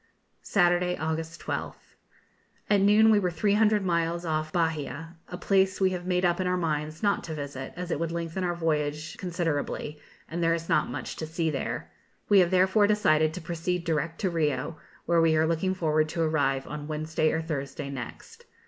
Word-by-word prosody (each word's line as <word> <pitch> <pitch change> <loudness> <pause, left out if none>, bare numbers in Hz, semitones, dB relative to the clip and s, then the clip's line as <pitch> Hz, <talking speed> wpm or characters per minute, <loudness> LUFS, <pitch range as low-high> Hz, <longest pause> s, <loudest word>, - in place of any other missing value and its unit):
Saturday, 180 -1 +2
August 160 +1 -3
12th. - - -5 0.8
At 200 -1 +5
noon 210 +2 +6
we 210 - +5
were 185 -3 0
300 210 +3 +2
miles 170 0 0
off 155 -1 -1
Bahia, 160 -1 -2
a 180 - -6
place 190 0 +2
we 190 -1 +3
have 180 -1 -4
made 180 0 +1
up 175 0 +2
our 180 -1 +1
minds 155 -1 -2
not 200 -1 +2
to 160 - -5
visit, 140 -3 -6
as 180 0 -5
it - - -1
would 165 0 -2
lengthen 170 +2 -3
our 175 -1 0
voyage 155 -2 -1
considerably, 165 -4 -2 0.3
and 170 +2 -4
there 165 0 +3
is 165 0 -6
not - - +2
much 130 +1 -5
to 160 - -4
see 160 0 -1
there. 135 - -4 0.4
We 205 -2 +7
have 180 -2 +4
therefore 190 +3 +4
decided 155 -7 +3
to 180 - -6
proceed 170 +2 -2
direct 165 0 -1
to 190 - +1
Rio, 160 -1 -1 0.3
where 170 -1 +3
we 165 -1 +4
are 160 - +3
looking 170 +3 0
forward 155 -3 +1
to 165 +1 -1
arrive 140 -4 +1
on 150 0 -6
Wednesday 155 0 0
or 160 - -1
Thursday 140 -3 -4
next. 125 -4 -8
165 Hz, 185 wpm, -27 LUFS, 155-180 Hz, 0.8 s, We